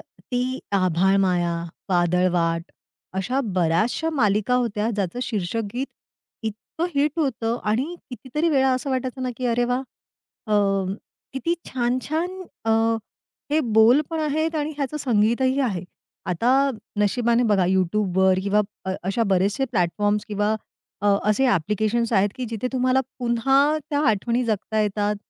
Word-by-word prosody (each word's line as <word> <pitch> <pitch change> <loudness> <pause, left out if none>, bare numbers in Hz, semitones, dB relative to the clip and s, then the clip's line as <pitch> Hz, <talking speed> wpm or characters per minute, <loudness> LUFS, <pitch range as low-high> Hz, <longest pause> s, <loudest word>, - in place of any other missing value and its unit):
ती 250 +1 -4
"आभाळमाया," 185 -1 +2 0.4
"वादळवाट" 175 -1 +1 0.5
अशा 250 +8 0
बऱ्याचशा 185 - +1
मालिका 215 -4 +2
होत्या, 230 -3 0
ज्याचं 200 -1 -2
शीर्षक 220 -2 -2
गीत 260 +3 -1 0.6
इतकं 220 +10 -4
हिट 290 +3 +1
होतं 240 -6 0
आणि 250 +11 0 0.2
कितीतरी 265 +6 -2
वेळा 265 -4 +3
असं 255 +2 -3
वाटायचं 260 0 -2
ना, 255 - -1
की 255 - -2
"अरे 240 0 +2
वाह! 250 +2 0 0.6
अ, 215 - -2 0.8
किती 270 +6 -1
छान-छान 310 +9 -2 0.2
अ, 225 - +1 0.8
हे 300 - +3
बोल 230 +2 +5
पण 325 -1 -2
आहेत 315 +2 0
आणि 300 0 -1
ह्याचं 285 +1 -2
संगीतही 255 +1 +2
आहे." 200 -10 -1 0.4
आता 185 +7 +1 0.5
नशिबाने 235 +3 +2
बघा 190 -3 +3
YouTube 190 +1 +1
वर 190 0 +4
किंवा 200 +2 +2 0.2
अ, 190 - -1
अशा 195 +6 0
बरेचसे 195 +8 +2
प्लॅटफॉर्म्स 205 +5 +1
किंवा 210 +1 0 0.5
अ, 205 - +1 0.2
असे 265 +5 +2
ॲप्लिकेशन्स 220 +4 +1
आहेत 200 0 +4
की 255 - -3
जिथे 225 +2 -3
तुम्हाला 255 0 +2 0.2
पुन्हा 270 +5 +2
त्या 290 - +1
आठवणी 235 +3 +1
जगता 220 -1 -1
येतात. 210 0 0
230 Hz, 135 wpm, -23 LUFS, 195-260 Hz, 0.8 s, बोल